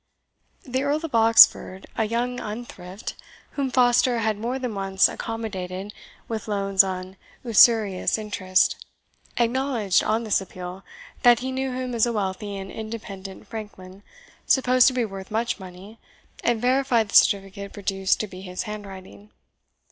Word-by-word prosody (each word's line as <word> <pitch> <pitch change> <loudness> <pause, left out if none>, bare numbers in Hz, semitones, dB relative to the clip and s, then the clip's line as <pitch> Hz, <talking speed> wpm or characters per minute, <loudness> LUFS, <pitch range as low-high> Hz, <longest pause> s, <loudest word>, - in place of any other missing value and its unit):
The 260 -1 -2
Earl 295 +3 -1
of 315 - -8
Oxford, 225 -4 +5
a 220 - 0
young 240 +3 -2
unthrift, 210 -3 -7 0.4
whom 275 -2 -2
Foster 245 -1 +3
had 220 -1 0
more 235 +5 -3
than 250 -4 -4
once 195 -1 +2
accommodated 205 -4 -5 0.3
with 225 -2 -5
loans 195 -2 +3
on 185 0 -6 0.3
usurious 220 -5 +4
interest, 190 -3 0 0.5
acknowledged, 240 -4 +1
on 220 +2 0
this 215 -3 +1
appeal, 185 0 -9 0.4
that 240 -2 +5
he 260 +1 -3
knew 265 0 -2
him 255 -1 -4
as 235 0 +2
a 235 - -2
wealthy 200 0 -3
and 195 0 -7
independent 205 -4 -8
franklin, 200 -4 -9 0.5
supposed 255 -1 +4
to 260 - +3
be 250 -2 0
worth 195 -2 -8
much 225 +1 -2
money, 190 +4 -12 0.4
and 235 -2 +1
verified 250 -2 +1
the - - -5
certificate 200 0 +3
produced 195 -1 -1
to 215 - -4
be 185 -1 -11
his 180 -1 -5
handwriting. 205 -2 -9
215 Hz, 145 wpm, -24 LUFS, 195-240 Hz, 0.5 s, Oxford